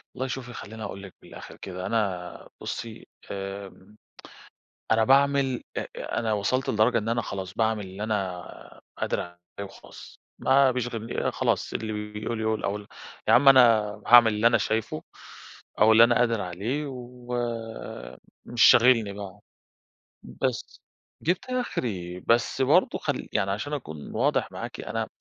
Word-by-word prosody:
والله 130 - -2
شوفي، 125 -2 -6
خلّيني 110 0 -8
أقول 100 -1 -6
لِك 95 - -11
من - - -15
الآخِر - - -11
كده، 90 -1 -7
أنا 95 -4 -2
بُصّي 115 -2 -6 0.2
آآ، 100 0 -7 1.0
أنا 110 0 +4
باعمل، 135 -1 +3
أ - - -1 0.3
أنا 115 -2 0
وصَلت 110 +6 0
لدرجة 110 +2 +3
إن 110 0 -4
أنا 120 +1 0
خلاص، 95 -2 -6
باعمل 110 -2 0
اللي 95 +2 -8
أنا 95 -5 -5 0.2
قادر - - -1
عليه 85 0 -9 0.3
وخلاص، - - -14 0.2
ما 135 0 +4
بيشغلن 120 -2 -2
خلاص، - - -1
اللي 110 -1 -3 0.2
بيقول 110 +2 -4
يقول 110 0 -1
أو 100 - 0
ال 105 -1 -9 0.4
يا - - +6
عم 135 +3 +7
أنا 135 -1 +9 0.5
هاعمل 120 -2 +8
اللي 105 +2 +2
أنا 115 0 +5
شايفه 110 +2 -2 0.8
أو 110 +1 +7
اللي 115 +1 +8
أنا 120 -1 +3
قادِر 115 -3 +2
عليه 105 +12 -3
و 125 -1 -8 1.1
مش 120 -3 0
شاغلني 115 -4 +6
بقى، 100 0 -9 0.8
بس 130 -4 -4 0.4
جِبت 175 +3 0
آخري، 105 - -3
بس 120 +5 +1
برضه 130 - +3
خل - - -3
يعني 100 -1 +1
عشان 105 +9 -3
أكون 80 - -6
واضح - - +1
معاكِ، - - -7
أنا - - -3
110 Hz, 150 wpm, -26 LUFS, 100-125 Hz, 1.1 s, أنا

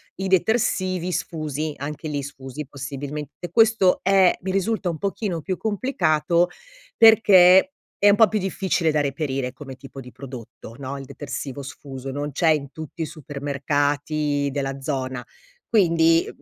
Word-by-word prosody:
i 190 0 -3
detersivi 185 -2 +1
sfusi, 155 -2 -3
anche 150 +2 -5
lì 145 -1 -2
sfusi 135 +1 -8
possibilmente. 145 +4 -7
Questo 220 -2 +4
è 190 -2 +4
mi 190 - -3
risulta 195 0 0
un 165 - -3
pochino 195 -2 -3
più 185 +5 -3
complicato, 180 - +1 0.5
perché 205 0 +7 0.3
è 205 - +6
un 200 - +6
po' 220 0 +7
più 215 - -1
difficile 185 -3 0
da 150 - +1
reperire 135 -2 -2
come 135 -1 -9
tipo 135 0 -10
di 125 -1 -12
prodotto, 120 -4 -10
no, 140 0 -5
il 135 - -8
detersivo 135 0 -6
sfuso. 135 -1 -8
Non 145 +2 -4
c'è 165 +2 +2
in 140 -3 +1
tutti 160 +2 -6
i - - -2
supermercati 145 0 -1
della 135 -1 -3
zona, 130 -3 -3 0.4
quindi 165 -6 +3
150 Hz, 145 wpm, -23 LUFS, 140-185 Hz, 0.5 s, perché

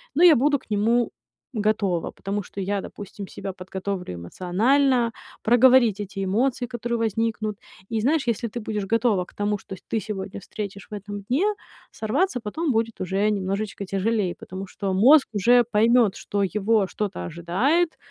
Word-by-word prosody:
но 340 - +4
я 335 -4 +9
буду 285 +3 +3
к - - -24
нему 225 +3 +2 0.4
готова. 205 -6 0
Потому 200 +1 -4
что 195 - -7
я, 200 +1 -1
допустим, 200 0 -8
себя 195 - -6
подготовлю 190 - -5
эмоционально, 230 - +2 0.3
проговорить 240 -2 +5
эти 195 -1 -4
эмоции, 245 +5 0
которые 235 -1 -3
возникнут. 220 -1 -1 0.3
И 225 -1 -1
знаешь, 285 +3 +1
если 235 0 0
ты 240 - -5
будешь 210 -2 -3
готова 225 -5 +2
к - - -20
тому, 205 0 0
что 190 - -9
с - - -16
ты 225 - 0
сегодня 200 -2 -5
встретишь 200 0 -7
в - - -7
этом 205 0 -6
дне, 265 - +1 0.5
сорваться 255 - 0
потом 285 +9 -2
будет 230 -1 -1
уже 195 +3 +1
немножечко 200 0 -2
тяжелей. 195 -1 0
Потому 190 +1 -8
что 195 0 -3
мозг 265 +10 +6
уже 240 +4 +5
поймёт, 225 -1 +3
что 200 -1 -2
его 205 +1 +1
что-то 190 - -4
ожидает. 220 - 0
210 Hz, 160 wpm, -24 LUFS, 195-240 Hz, 0.5 s, я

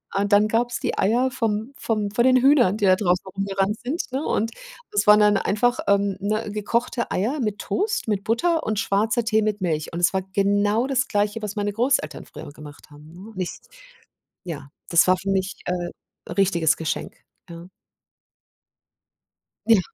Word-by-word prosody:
und 200 +1 0
dann 205 +1 +5
gab 235 +2 +1
es - - -3
die - - -2
Eier 240 +6 +2
vom 225 +1 -2
vom 215 -3 -1
von 235 +3 +2
den 255 0 +5
Hühnern, 255 -7 +4
die 205 - 0
da 185 -1 +6
draußen 180 -2 0
rumgerannt 195 +1 -1
sind, 270 +8 -3
ne, 270 +4 -2
und 225 +2 -1 0.4
es 205 0 +1
waren 210 0 +8
dann 210 -1 +4
einfach, 245 +5 +1
ähm, 200 -1 +2
ne, 215 +2 -2
gekochte 235 +3 -2
Eier 235 +11 -1
mit 210 -5 -2
Toast, 420 - -2
mit 200 -2 -1
Butter 320 +9 +1
und 215 -1 -2
schwarzer 220 +4 0
Tee 220 -1 +2
mit 210 -1 -1
Milch 155 -4 -2
und 170 - -4
es 175 - +3
war 190 - +1
genau 205 +4 +1
das 265 -1 0
Gleiche, 210 +1 -1
was 210 0 -5
meine 205 0 -2
Großeltern 250 +5 0
früher - - -10
gemacht 150 0 -13
haben, 150 +2 -15
ne? 195 +6 -12
Nicht 185 -1 -5 0.8
ja, 150 -5 -7 0.2
das 170 +1 +4
war 185 0 +4
für 195 +2 -5
mich, 190 -1 -1
äh, 175 -1 -6
richtiges 175 -5 +2
Geschenk, 160 - -4 0.3
ja. 170 +1 -10 2.0
Ja. 225 -4 +6
205 Hz, 180 wpm, -23 LUFS, 190-230 Hz, 2.0 s, waren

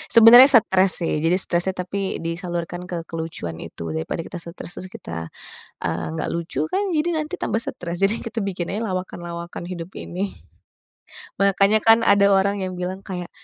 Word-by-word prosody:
Sebenernya 240 +4 +10
stres 190 -6 +4
sih, 160 -2 -1
jadi 180 +3 +3
stresnya 175 +1 0 0.2
tapi 195 0 -3
disalurkan 175 +1 -4
ke 175 -2 -6
kelucuan 160 - -5
itu, 80 -1 -6
daripada 80 - -3
kita 165 - -7
stres, 170 0 -7
terus 185 - -7
kita, 80 -1 -7 0.5
eee, 80 - -2
enggak 80 0 -3
lucu 160 -3 -2
kan, 395 - 0
jadi 315 +2 +1
nanti 305 0 -4
tambah 225 - 0
stress, 175 +2 -4
jadi 210 +4 +2
kita 230 -1 -4
bikin 185 -3 -3
aja 220 - -2
lawakan-lawakan 175 -2 -5
hidup 180 0 -6
ini. 190 +3 -4 1.0
Makanya 195 +2 +4
kan 225 0 +6
ada 200 0 +6
orang 200 +1 +1
yang 185 - -6
bilang 185 +1 -3
kayak, 180 -2 -5
180 Hz, 165 wpm, -22 LUFS, 170-200 Hz, 1.0 s, Sebenernya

